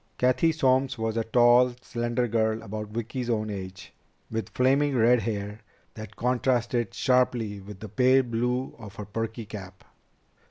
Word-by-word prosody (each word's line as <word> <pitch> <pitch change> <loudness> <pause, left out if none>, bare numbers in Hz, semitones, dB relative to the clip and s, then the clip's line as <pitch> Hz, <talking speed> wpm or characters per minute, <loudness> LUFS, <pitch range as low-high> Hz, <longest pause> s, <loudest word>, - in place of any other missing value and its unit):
Cathy 130 +6 +3
Solms 130 -3 +1
was 110 0 -2
a 115 - 0
tall, 120 +2 +4
slender 120 +1 -1
girl 110 0 0
about 105 0 -5
Vicki's 115 +3 -4
own 110 -2 -1
age, 95 -1 -8 0.4
with 110 0 -3
flaming 135 +2 +2
red 120 +1 +4
hair 105 -2 -4 0.3
that 110 -1 -9
contrasted 120 -2 0
sharply 125 -5 +1
with 100 0 -11
the 110 - -6
pale 130 +5 +4
blue 125 +2 -2
of 105 -3 -10
her 105 - -7
perky 115 +2 -4
cap. 95 -3 -10
115 Hz, 150 wpm, -26 LUFS, 110-125 Hz, 0.4 s, tall